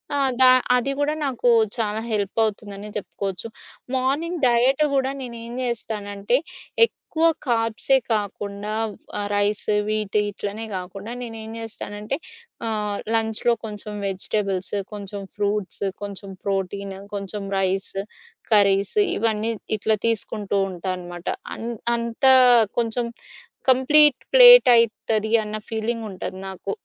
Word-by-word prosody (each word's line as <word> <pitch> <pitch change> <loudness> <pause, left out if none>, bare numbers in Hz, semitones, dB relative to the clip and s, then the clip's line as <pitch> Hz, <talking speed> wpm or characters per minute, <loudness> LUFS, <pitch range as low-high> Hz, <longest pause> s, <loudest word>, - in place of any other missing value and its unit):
ఆహ్, 275 -2 +2
దా 255 - +9 0.3
అది 250 +2 +1
గూడా 290 +1 +1
నాకు 250 -2 +1 0.3
చాలా 215 -2 -1
హెల్పవుతుందనే 205 0 -1
చెప్పుకోవచ్చు. 195 -1 -4 0.5
మార్నింగ్ 300 +7 -1
డైట్ 250 +4 +3
గూడా 265 -1 +1
నేనేం 235 -2 -7
జేస్తానంటే 215 -2 -1 0.5
ఎక్కువ 325 -7 -3 0.2
కార్బ్స్ 230 +1 -1 0.2
కాకుండా, 205 0 -3 0.5
ఆ - - -1
రైస్ 205 0 0 0.2
వీటి 215 -1 0
ఇట్లనే 205 +2 -5
కాకుండా, 195 +4 -7
నేనేం 225 -2 -7
జేస్తానంటే 215 +1 -5 0.5
ఆహ్, 210 -2 -2 0.2
లంచ్‌లో 225 +1 +2
కొంచెం 210 0 -5
వెజిటబుల్స్, 195 0 -1 0.2
కొంచెం 200 -1 -6 0.2
ఫ్రూట్స్, 205 -1 -2 0.2
కొంచెం 200 -1 -7 0.2
ప్రోటీన్, 195 0 -2 0.2
కొంచెం 200 0 -4
రైస్, 190 0 -1 0.6
కర్రీస్ 200 - +3 0.2
ఇవన్నీ 225 0 0 0.3
ఇట్లా 215 +1 +1
తీసుకుంటూ 210 -3 -1
ఉంటానమాట. 175 -1 -6 0.3
అన్ 230 - -5 0.3
అంతా 235 +3 +3 0.5
కొంచెం 235 +1 0 0.6
కంప్లీట్ 265 +2 +5
ప్లేట్ - - +10
అయితది 220 -1 +1
అన్న 210 0 -5
ఫీలింగ్ 225 +1 -2
ఉంటది 185 -1 -6
నాకు. 190 +1 -5
215 Hz, 105 wpm, -23 LUFS, 200-235 Hz, 0.6 s, ప్లేట్